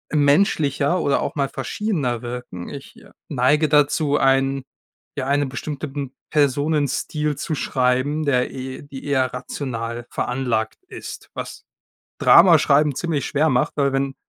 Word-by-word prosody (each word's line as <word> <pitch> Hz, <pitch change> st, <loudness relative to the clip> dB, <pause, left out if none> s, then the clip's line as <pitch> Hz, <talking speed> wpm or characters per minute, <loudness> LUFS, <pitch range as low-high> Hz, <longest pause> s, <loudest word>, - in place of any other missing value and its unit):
menschlicher 145 Hz, +1 st, +2 dB
oder 140 Hz, -, +1 dB
auch -, -, -3 dB
mal 140 Hz, -2 st, 0 dB
verschiedener 135 Hz, -, -2 dB
wirken. 120 Hz, -7 st, -7 dB
Ich 140 Hz, -1 st, -10 dB, 0.3 s
neige 150 Hz, +3 st, +2 dB
dazu, 145 Hz, 0 st, +3 dB
einen 135 Hz, 0 st, +2 dB, 0.5 s
ja, 130 Hz, -, -2 dB
einen 140 Hz, -1 st, +1 dB
bestimmten 140 Hz, -1 st, -5 dB, 0.2 s
Personenstil 150 Hz, +1 st, 0 dB
zu 160 Hz, -, -3 dB
schreiben, 130 Hz, +4 st, 0 dB
der 125 Hz, -3 st, +1 dB
e 130 Hz, 0 st, -7 dB
die 140 Hz, -1 st, -10 dB
eher 130 Hz, -3 st, +1 dB
rational 120 Hz, -2 st, -5 dB
veranlagt 120 Hz, -3 st, -2 dB
ist, -, -, -9 dB
was -, -, -7 dB, 0.6 s
Drama 170 Hz, -1 st, +7 dB
schreiben 145 Hz, 0 st, +3 dB
ziemlich 160 Hz, -1 st, -2 dB
schwer 150 Hz, +2 st, +1 dB
macht, 125 Hz, -4 st, +1 dB
weil 140 Hz, -2 st, +2 dB
wenn 135 Hz, 0 st, -1 dB
140 Hz, 130 wpm, -22 LUFS, 130-150 Hz, 0.6 s, Drama